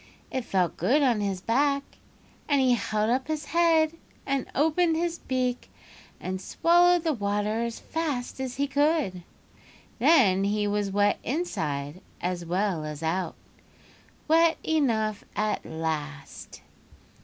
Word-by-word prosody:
It 260 - -2
felt 185 -3 0
good 290 +4 +2
on 240 -6 +2
his 195 -2 -2
back, 280 +6 +1 0.7
and 285 -1 +3
he 255 -2 +4
held 215 -1 0
up 255 +1 0
his 310 -1 -3
head, 330 -2 +3 0.3
and 275 -2 -1
opened 320 +3 +2
his 340 +1 -1
beak, 255 -1 -2 0.5
and 185 0 -4
swallowed 350 - +3
the 320 -2 +1
water 210 0 -1
as 235 -1 -5
fast 290 -7 -3
as 260 -2 -4
he 280 - 0
could. 285 - +1 0.8
Then 195 - +5
he 210 +1 0
was 205 -1 0
wet 205 +1 +2
inside 160 - -3 0.2
as 180 -1 -2
well 180 -1 -1
as 150 0 -6
out—wet 300 - -2
enough 225 -9 0
at 215 0 -1
last. 155 -3 -5
235 Hz, 130 wpm, -27 LUFS, 190-300 Hz, 0.8 s, Then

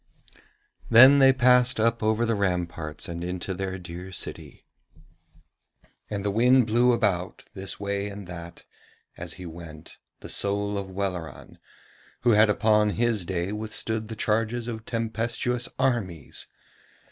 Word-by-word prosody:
Then 130 +5 +8
they 135 -1 +7
passed 125 -1 +4
up 115 +1 +2
over 110 +2 +1
the 115 - +1
ramparts 90 -6 -2
and 85 0 -5
into 90 +2 -4
their 95 0 -4
dear 90 +1 -9
city. 90 - -6 1.4
And 100 -1 -4
the 100 - +1
wind 125 +4 +4
blew 120 +3 +3
about, 95 -6 -1
this 95 -2 -5
way 100 0 -2
and 100 -1 -8
that, 85 -1 -9 0.5
as 85 -1 -5
he 95 - -10
went, 80 -2 -11 0.2
the - - -8
soul 100 +1 -1
of 100 -1 -4
Welleran 95 -4 -5 0.6
who 120 - +3
had 105 0 +5
upon 105 0 +3
his 115 -2 0
day 90 +1 -2
withstood 110 +1 -3
the 110 - -6
charges 115 +2 -1
of 115 -2 -6
tempestuous 115 +1 -2
armies. 95 - -2
105 Hz, 135 wpm, -26 LUFS, 90-115 Hz, 1.4 s, Then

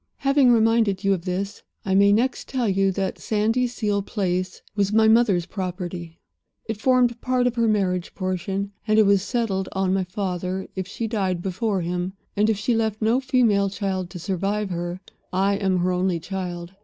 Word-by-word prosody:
"Having 275 -2 +4
reminded 225 -4 +3
you 195 0 +3
of 180 -2 -4
this, 195 +2 -3 0.2
I 190 - 0
may 200 +1 +5
next 240 +5 +1
tell 255 -3 -1
you 195 0 +2
that 195 0 -2
Sandyseal 220 -1 0
Place 185 -3 -2
was 200 -1 +1
my 220 0 +4
mother's 220 -6 +4
property. 180 -3 -5 0.5
It 220 -1 -5
formed 245 -1 +3
part 255 -1 +1
of 245 - +2
her 230 -1 +1
marriage 185 -4 0
portion, 190 +1 -2 0.2
and 215 0 +3
it 215 - +6
was 200 -1 +4
settled 200 -3 -1
on 190 -1 +1
my 190 -1 +1
father 185 0 -3
if 190 -1 -3
she 225 +3 -4
died 190 -6 -1
before 195 +1 -1
him, 180 +2 -2 0.2
and 210 +2 +2
if 220 - +1
she 210 +4 0
left 220 -1 0
no 225 +3 +2
female 240 -7 +2
child 190 -2 -3
to 180 - -8
survive 195 +3 -2
her. 175 +1 -3 0.3
I 195 +2 +2
am 190 -2 +1
her 180 +1 +1
only 180 -1 0
child. 175 0 -5
195 Hz, 180 wpm, -23 LUFS, 185-220 Hz, 0.5 s, it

